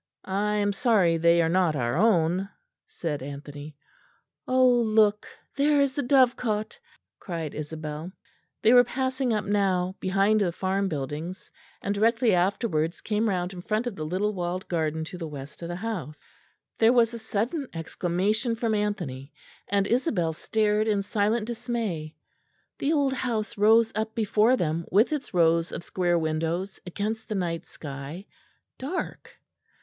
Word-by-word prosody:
"I 205 Hz, +2 st, 0 dB
am 205 Hz, -1 st, +1 dB
sorry 195 Hz, -7 st, +3 dB
they 170 Hz, +1 st, +4 dB
are -, -, +2 dB
not 170 Hz, -2 st, +2 dB
our 120 Hz, -2 st, -1 dB
own," 185 Hz, -1 st, +2 dB, 0.4 s
said 150 Hz, -5 st, -4 dB
Anthony. 145 Hz, +1 st, -8 dB, 0.7 s
"Ah, 255 Hz, 0 st, +2 dB
look! 220 Hz, -4 st, +4 dB, 0.3 s
there 290 Hz, +1 st, +3 dB
is 280 Hz, -2 st, +2 dB
the 285 Hz, -, -1 dB
dovecote," 245 Hz, -5 st, +2 dB, 0.4 s
cried 165 Hz, -6 st, -5 dB
Isabel. 155 Hz, +2 st, -6 dB, 0.5 s
They 225 Hz, -, +6 dB
were 245 Hz, 0 st, +8 dB
passing 260 Hz, +1 st, -1 dB
up 215 Hz, -1 st, 0 dB
now 190 Hz, -3 st, +1 dB
behind 195 Hz, +3 st, +2 dB
the 180 Hz, -4 st, +1 dB
farm 190 Hz, +3 st, -1 dB
buildings; 155 Hz, +4 st, -5 dB, 0.3 s
and 200 Hz, -, 0 dB
directly 225 Hz, +2 st, +3 dB
afterwards 175 Hz, -3 st, 0 dB
came 220 Hz, +1 st, 0 dB
round 180 Hz, -1 st, -1 dB
in 180 Hz, -, -7 dB
front 215 Hz, +5 st, -1 dB
of 240 Hz, -5 st, -3 dB
the 155 Hz, -, -5 dB
little 190 Hz, +7 st, -1 dB
walled 180 Hz, 0 st, -3 dB
garden 160 Hz, -2 st, -1 dB
to 180 Hz, +3 st, -8 dB
the 165 Hz, -, -4 dB
west 145 Hz, 0 st, -9 dB
of 170 Hz, -, -5 dB
the 175 Hz, -, -4 dB
house. 180 Hz, -7 st, -5 dB, 0.6 s
There 225 Hz, +1 st, +6 dB
was 235 Hz, -2 st, +4 dB
a 235 Hz, -, -5 dB
sudden 225 Hz, +7 st, -2 dB
exclamation 190 Hz, +8 st, -1 dB
from 225 Hz, -1 st, -1 dB
Anthony; 175 Hz, -11 st, -2 dB, 0.4 s
and 200 Hz, -1 st, +1 dB
Isabel 210 Hz, -, +1 dB
stared 215 Hz, +4 st, +1 dB
in 205 Hz, -2 st, +1 dB
silent 210 Hz, +2 st, 0 dB
dismay. 225 Hz, -10 st, -3 dB, 0.6 s
The 280 Hz, -, +1 dB
old 285 Hz, -4 st, +2 dB
house 235 Hz, -4 st, -2 dB
rose 225 Hz, +2 st, +5 dB
up 220 Hz, +1 st, -3 dB
before 220 Hz, +2 st, +3 dB
them 165 Hz, -2 st, -1 dB
with 215 Hz, -, +4 dB
its 290 Hz, -2 st, -4 dB
rows 165 Hz, -1 st, +3 dB
of -, -, -6 dB
square 175 Hz, -1 st, +1 dB
windows 165 Hz, +4 st, -2 dB
against 215 Hz, +5 st, -3 dB
the 215 Hz, -, -2 dB
night 170 Hz, -3 st, -2 dB
sky, 145 Hz, +5 st, -8 dB, 0.5 s
dark. 310 Hz, +8 st, -5 dB
200 Hz, 155 wpm, -26 LUFS, 165-225 Hz, 0.7 s, were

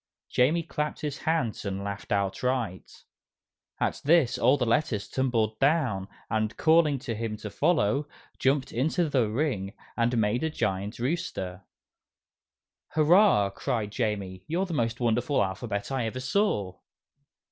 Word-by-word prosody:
Jamie 155 Hz, +7 st, +2 dB
clapped 150 Hz, -2 st, -3 dB
his 150 Hz, -1 st, -3 dB
hands 145 Hz, -9 st, -1 dB
and 100 Hz, -1 st, -3 dB
laughed 100 Hz, -1 st, -6 dB
outright. 100 Hz, +1 st, -2 dB, 0.8 s
At -, -, -1 dB
this, 155 Hz, -4 st, +3 dB
all 140 Hz, -, +4 dB
the 125 Hz, -, 0 dB
letters 115 Hz, -4 st, 0 dB
tumbled 115 Hz, -5 st, 0 dB
down, 135 Hz, -10 st, +2 dB, 0.2 s
and, 110 Hz, -1 st, -1 dB
calling 160 Hz, -2 st, +4 dB
to 125 Hz, -2 st, -4 dB
him 110 Hz, -1 st, -3 dB
to 105 Hz, -1 st, -7 dB
follow, 145 Hz, -, +1 dB, 0.3 s
jumped 135 Hz, 0 st, +1 dB
into 160 Hz, +8 st, +1 dB
the 130 Hz, -7 st, +1 dB
ring 105 Hz, -6 st, -1 dB, 0.2 s
and 120 Hz, +1 st, +1 dB
made 110 Hz, +3 st, +1 dB
a 160 Hz, -, +1 dB
giant 100 Hz, -7 st, -2 dB
rooster. 100 Hz, -, -3 dB, 1.3 s
"Hurrah!" 155 Hz, -, +5 dB
cried 105 Hz, +1 st, -2 dB
Jamie, 100 Hz, -5 st, -2 dB
"you're 175 Hz, +4 st, 0 dB
the 180 Hz, -, -5 dB
most 115 Hz, -4 st, -1 dB
wonderful 120 Hz, +5 st, +2 dB
alphabet 100 Hz, +4 st, -3 dB
I 130 Hz, -4 st, 0 dB
ever 130 Hz, +3 st, -4 dB
saw!" 130 Hz, -, 0 dB
120 Hz, 135 wpm, -27 LUFS, 105-150 Hz, 1.3 s, Hurrah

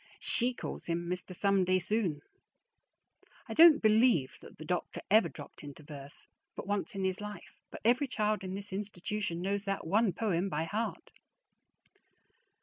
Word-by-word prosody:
She 245 Hz, +1 st, +1 dB
calls -, -, -6 dB
him 170 Hz, 0 st, -2 dB
"Mister 180 Hz, +1 st, -3 dB
Someday 185 Hz, -1 st, +3 dB
Soon." 185 Hz, -5 st, -1 dB, 1.3 s
I -, -, -5 dB
don't 325 Hz, -4 st, +8 dB
believe 215 Hz, -, +4 dB
that -, -, -14 dB
the 155 Hz, -, -9 dB
doctor 180 Hz, +2 st, -3 dB
ever 220 Hz, +2 st, +5 dB
dropped -, -, -11 dB
into 145 Hz, +1 st, -10 dB
verse 145 Hz, -1 st, -11 dB, 0.3 s
but -, -, -6 dB
once 205 Hz, +2 st, -2 dB
in 195 Hz, -, -2 dB
his 190 Hz, +1 st, -1 dB
life, 210 Hz, -3 st, -9 dB
but -, -, -10 dB
every 250 Hz, +5 st, +3 dB
child 215 Hz, -4 st, 0 dB
in 185 Hz, 0 st, -4 dB
this 200 Hz, 0 st, -6 dB
institution 200 Hz, -2 st, -3 dB
knows 200 Hz, +1 st, -1 dB
that 195 Hz, 0 st, -2 dB
one 205 Hz, +5 st, +3 dB
poem 185 Hz, -1 st, -1 dB
by 155 Hz, -2 st, -1 dB
heart. 215 Hz, +8 st, -4 dB
195 Hz, 155 wpm, -32 LUFS, 175-215 Hz, 1.3 s, don't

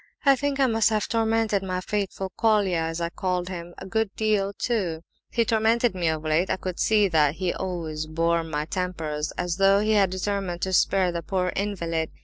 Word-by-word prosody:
I 275 Hz, -1 st, +7 dB
think 280 Hz, +1 st, -2 dB
I 270 Hz, -, +5 dB
must 225 Hz, -3 st, +3 dB
have 215 Hz, -1 st, 0 dB
tormented 225 Hz, -2 st, +1 dB
'my 185 Hz, -1 st, -2 dB
faithful 195 Hz, -1 st, -3 dB
Colia' 205 Hz, -6 st, +2 dB
(as 165 Hz, +1 st, -4 dB
I 170 Hz, 0 st, -1 dB
called 180 Hz, 0 st, -2 dB
him) 175 Hz, -1 st, -7 dB
a -, -, -8 dB
good 220 Hz, +2 st, 0 dB
deal 210 Hz, -2 st, +1 dB
too. 190 Hz, -8 st, -2 dB, 0.3 s
He 230 Hz, 0 st, +1 dB
tormented 225 Hz, +1 st, +2 dB
me 180 Hz, -3 st, -1 dB
of 160 Hz, -1 st, -1 dB
late; 155 Hz, +4 st, +1 dB
I -, -, +2 dB
could 185 Hz, -1 st, -6 dB
see 210 Hz, -2 st, +4 dB
that 150 Hz, -3 st, +3 dB
he 180 Hz, -1 st, -1 dB
always 160 Hz, -4 st, -4 dB
bore 165 Hz, +1 st, +1 dB
my 150 Hz, -2 st, -3 dB
tempers 160 Hz, -4 st, -3 dB
as 175 Hz, -1 st, -2 dB
though 195 Hz, 0 st, +5 dB
he 215 Hz, +1 st, +1 dB
had 200 Hz, -3 st, +4 dB
determined 185 Hz, -1 st, -3 dB
to 190 Hz, -, -1 dB
'spare 185 Hz, 0 st, +3 dB
the 170 Hz, 0 st, -3 dB
poor 180 Hz, +1 st, -1 dB
invalid. 170 Hz, -6 st, -2 dB
185 Hz, 200 wpm, -25 LUFS, 170-210 Hz, 0.3 s, I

